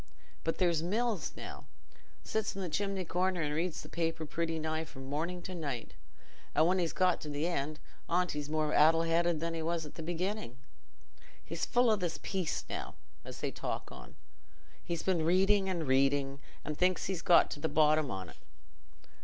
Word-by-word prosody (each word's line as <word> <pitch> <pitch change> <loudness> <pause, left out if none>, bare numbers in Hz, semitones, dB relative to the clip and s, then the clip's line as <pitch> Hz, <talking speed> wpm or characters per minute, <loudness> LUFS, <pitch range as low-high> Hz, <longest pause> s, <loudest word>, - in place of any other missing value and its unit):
But 165 - 0
there's 170 -4 +2
Mills, 215 +3 0
now, - - -8 0.6
sits 220 -2 -2
i' - - -3
the 185 -2 -2
chimney 195 +2 -1
corner 180 +1 0
and 150 0 -1
reads 165 +2 -1
the - - -9
paper 165 -1 -2
pretty 165 +1 -1
nigh 160 0 -1
from 135 -4 -10
morning 165 +6 -3
to 185 - -5
night, 140 -9 -4 0.6
and 155 - +5
when 185 +2 +3
he's 170 -2 +1
got 185 -1 +2
to 150 - -5
th' 145 +2 -1
end 155 -3 -1 0.3
on't 180 +1 +2
he's 150 0 -4
more 155 -1 0
addle 165 +2 +6
headed 165 0 +2
than 165 +1 -2
he 165 - -2
was 165 0 -1
at 150 - -10
the - - -7
beginning. 175 - -3 0.9
He's 165 +1 -3
full 245 -1 +4
o' - - +5
this 175 -4 -2
peace 185 -5 -2
now, - - -5 0.3
as - - -9
they - - -1
talk - - -4
on; - - -11 0.7
he's 170 -1 -3
been 180 -4 +2
reading 190 +3 +4
and 170 -4 -1
reading, 135 +1 +2 0.3
and 150 - -2
thinks 180 -1 +2
he's 185 -3 -2
got 175 - +6
to - - -4
the 160 - -1
bottom 155 -2 +4
on't. 95 -5 -5
165 Hz, 185 wpm, -33 LUFS, 155-180 Hz, 0.9 s, addle